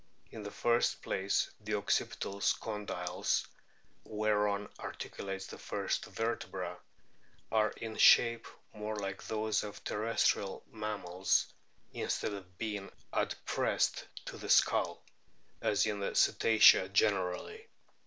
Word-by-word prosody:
In 110 - -8
the 105 - -5
first 120 +3 +1
place 95 +1 0
the - - -2
occipital 100 0 -1 0.2
condyles, 95 -5 -2 0.6
whereon 105 -1 0
articulates 95 -1 -6
the - - -10
first - - -2
vertebra, 95 -6 -3 0.7
are 110 -1 +3
in 110 -1 -6
shape 115 -1 +6 0.3
more 105 0 -4
like 100 -1 -4
those 110 -1 0
of 105 -1 -8
terrestrial 105 -2 0
mammals 100 -4 0 0.4
in - - -4
stead 105 - -1
of 90 -2 -10
being 105 -3 -4 0.2
adpressed - - 0 0.2
to - - -7
the - - -8
skull, - - +3 0.6
as 105 - +2
in 105 -2 -1
the 100 - -3
Cetacea 110 -4 +6
generally. 100 - 0
105 Hz, 115 wpm, -33 LUFS, 95-110 Hz, 0.7 s, shape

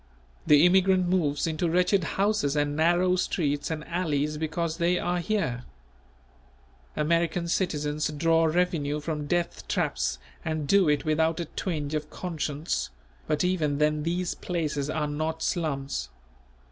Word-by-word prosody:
The 150 +2 +7
immigrant 185 0 +4
moves 150 -6 +1
into 165 +1 -1
wretched 180 +2 +2
houses 200 -8 +1
and 145 0 0
narrow 175 +3 +3
streets 145 -5 -1
and 155 -2 -4
alleys 150 -4 -1
because 160 +1 -2
they 175 +1 +2
are 175 0 -1
here. 170 - -1 1.3
American 170 +2 +1
citizens 150 -4 0
draw 165 +2 +2
revenue 160 -3 0
from 150 -1 -4
death 175 +2 -1
traps - - -1 0.3
and 155 -2 -2
do 195 -1 +4
it 150 +1 +1
without 160 +2 +1
a 170 - -2
twinge 155 -3 -4
of 150 0 -2
conscience; 160 -3 -3 0.4
but 150 +2 +1
even 160 -6 +1
then 150 0 +2
these 175 +3 -1
places 150 -5 -2
are 155 -1 -1
not 155 +2 -3
slums. 140 - -2
160 Hz, 135 wpm, -27 LUFS, 150-175 Hz, 1.3 s, The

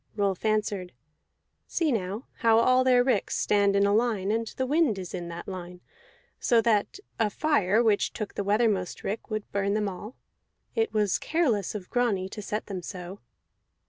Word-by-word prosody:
Rolf 200 -2 -1
answered: 210 -4 0 0.7
"See 325 -4 0
now 210 +1 -2
how 225 -1 +4
all 255 +2 +4
their 250 -1 +5
ricks 245 -6 0
stand 200 -1 +2
in 200 0 +4
a 200 - +2
line, 215 -3 +1
and 225 +1 -1
the 260 - -3
wind 290 -5 +2
is 185 -2 -7
in 175 -2 -4
that 170 0 -7
line, 180 -1 -7 0.6
so 235 -3 +3
that 225 - +1 0.2
a 220 -2 +2
fire 230 -5 +2
which 215 -3 +2
took 215 -3 -5
the 200 - -3
weathermost 205 -3 +1
rick 210 +3 -4
would 215 -1 -4
burn 200 0 0
them 210 -1 0
all. 205 +5 -7 0.6
It 450 -1 0
was 210 -3 +1
careless 245 - 0
of 190 -3 -7
Grani 225 -7 +1
to 210 - -7
set 210 +1 -3
them 190 -3 -5
so." 180 +2 -8
210 Hz, 175 wpm, -27 LUFS, 195-235 Hz, 0.7 s, their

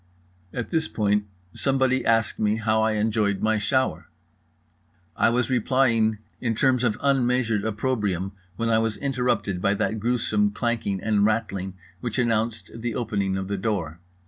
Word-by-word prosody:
At 125 -2 -5
this 160 -1 +1
point 105 -1 0 0.3
somebody 130 -1 +1
asked 115 -1 +1
me 105 0 +2
how 110 0 +1
I 110 0 +2
had 105 - 0
enjoyed 105 -2 +1
my 110 0 +2
shower? 130 +5 0 1.1
I - - +3
was 120 +1 0
replying 115 -3 +2 0.2
in 115 -2 -1
terms 125 +1 +2
of 115 -4 +1
unmeasured 125 -6 +2
opprobrium 105 -4 -1 0.2
when 115 +2 -1
I 110 - +4
was 115 -1 -1
interrupted 125 -8 -1
by 100 +2 +2
that 110 +2 -1
gruesome 125 - +1
clanking 115 -6 -1
and 105 -2 +2
rattling 100 -4 -1 0.2
which 120 +2 -4
announced 115 -2 0
the 115 0 -4
opening 100 -5 -1
of 95 0 -3
the 100 0 -2
door. 95 -6 -2
110 Hz, 155 wpm, -25 LUFS, 105-125 Hz, 1.1 s, I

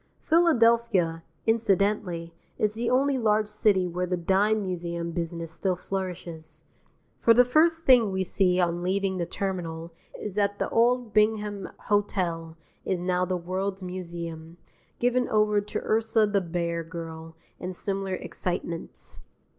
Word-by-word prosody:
Philadelphia, 230 - +3 0.2
incidentally, 200 -6 +1 0.2
is 210 -1 +1
the 235 +2 -1
only 270 +1 +2
large 215 -2 +2
city 210 -3 +2
where 180 +1 -2
the 180 0 -1
Dime 200 +5 +2
Museum 170 -2 -3
business 165 -1 -4
still 180 +2 -1
flourishes. 170 -4 -5 0.6
For 230 - +5
the 245 +1 +7
first 325 +5 +3
thing 240 -6 +6
we 190 0 0
see 185 -1 +2
on 175 -1 +1
leaving 190 +1 0
the 170 - -1
Terminal 170 -4 -4 0.3
is 210 - -5
that 200 0 +1
the - - -1
old 240 -1 +2
Bingham 210 -2 +1
Hotel 175 -6 -1 0.3
is 185 - -1
now 180 0 +1
The 185 0 -1
World's 190 +2 -3
Museum, 170 -2 -6 0.4
given 245 0 +1
over 210 -1 +3
to 205 - -4
Ursa 225 0 +2
the 205 -1 +1
Bear 170 -1 -2
Girl 165 -1 -8 0.2
and 185 0 -5
similar 195 0 -2
excitements. 170 -1 -5
190 Hz, 140 wpm, -27 LUFS, 170-215 Hz, 0.6 s, the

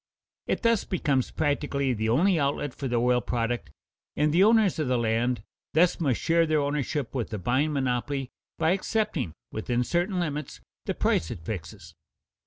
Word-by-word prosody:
It - - -1
thus 230 -3 +3
becomes 140 -8 0
practically 145 -3 0
the 110 -1 -1
only 170 - +3
outlet 140 -1 -1
for 135 - -4
the 120 - -1
oil 125 +1 +3
product, 120 -6 -2 0.5
and 150 0 +2
the 180 +3 +5
owners 215 -5 +4
of 155 - 0
the 125 -1 +2
land 115 0 0 0.3
thus 175 +3 +4
must 140 -8 +1
share 165 0 +3
their 155 0 +2
ownership 145 -1 -2
with 125 -4 -2
the 105 - -4
buying 130 - +1
monopoly 135 0 -1 0.3
by 160 +1 +2
accepting, 185 - -1 0.2
within 120 +3 -1
certain 175 - 0
limits, 150 -3 -3 0.3
the - - -1
price 80 - +1
it 80 - -7
fixes. 90 -7 -7
140 Hz, 170 wpm, -27 LUFS, 120-165 Hz, 0.5 s, the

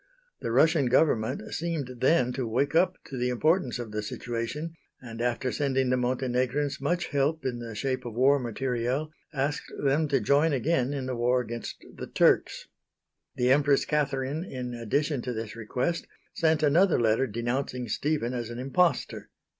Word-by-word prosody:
The - - -3
Russian 150 +2 +4
government 120 -5 +1
seemed 155 -7 -3
then 130 -2 +3
to 130 -2 -2
wake 130 +6 0
up 170 +3 +3
to 135 - -7
the 125 0 +1
importance 150 +2 +1
of 120 -3 -6
the 105 0 -2
situation, 120 +9 -4 0.3
and, 115 -2 -8
after 125 +1 0
sending 135 -3 0
the - - +4
Montenegrins 130 +3 -1
much 175 +5 -1
help 145 +3 0
in 125 -2 -2
the 115 -2 -7
shape 130 +3 -2
of 115 -2 -6
war 135 +3 +4
material, 125 +4 -2 0.2
asked 145 0 -2
them 145 +3 +1
to 140 -2 +2
join 145 +7 +3
again 135 0 +1
in 140 -2 -3
the 130 -1 -3
war 120 +2 +2
against 120 -1 -6
the - - -7
Turks. - - +2 0.7
The 125 +1 +2
Empress 140 0 +4
Catherine 145 0 -1
in 125 -8 -5
addition 135 +4 -1
to 125 +1 -3
this 110 -1 -5
request, 125 +9 -2 0.3
sent 160 -1 +2
another 170 +6 +4
letter 115 +3 +2
denouncing 120 +2 -2
Stephen 145 +1 -1
as 120 -2 -3
an 120 - -6
impostor. 135 +4 0
130 Hz, 165 wpm, -28 LUFS, 120-145 Hz, 0.7 s, Russian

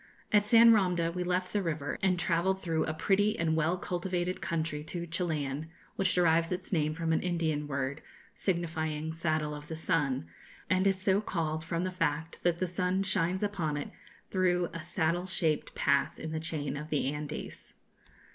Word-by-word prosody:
At 210 -1 +4
San 230 +1 +8
Romde 180 -5 +2
we 180 0 -2
left 180 +1 -1
the 205 - +2
river, 155 -5 -2
and 185 -2 +3
travelled 175 +2 +1
through 165 -4 0
a 155 - -2
pretty 205 +5 +2
and 160 -1 +1
well 160 +3 +2
cultivated 180 0 -2
country 160 -3 -2
to 170 +2 -4
Chilian, 160 -3 -2 0.3
which 195 -4 +1
derives 165 -1 +3
its 180 +2 -3
name 155 -2 +1
from 165 -1 0
an - - +2
Indian 160 -4 -1
word, 140 +1 -2 0.3
signifying 160 -3 -2
'saddle 155 -2 0
of 150 0 -8
the 160 - -5
sun,' 150 - 0 0.5
and 185 +1 +4
is 195 -1 +2
so 190 +1 +2
called 160 -6 -2
from 165 +2 -2
the 185 - -1
fact 165 -2 -2
that 175 -1 +2
the 185 - 0
sun 180 +2 0
shines 185 0 0
upon 170 -8 -1
it 145 - -5 0.4
through 180 -2 +2
a 165 - -5
saddle 170 +2 0
shaped 160 -5 0
pass 140 0 +2
in 160 - -5
the 160 - -2
chain 155 -3 -3
of 150 +1 -6
the 145 -2 0
Andes. 150 0 -6
170 Hz, 180 wpm, -31 LUFS, 155-185 Hz, 0.5 s, San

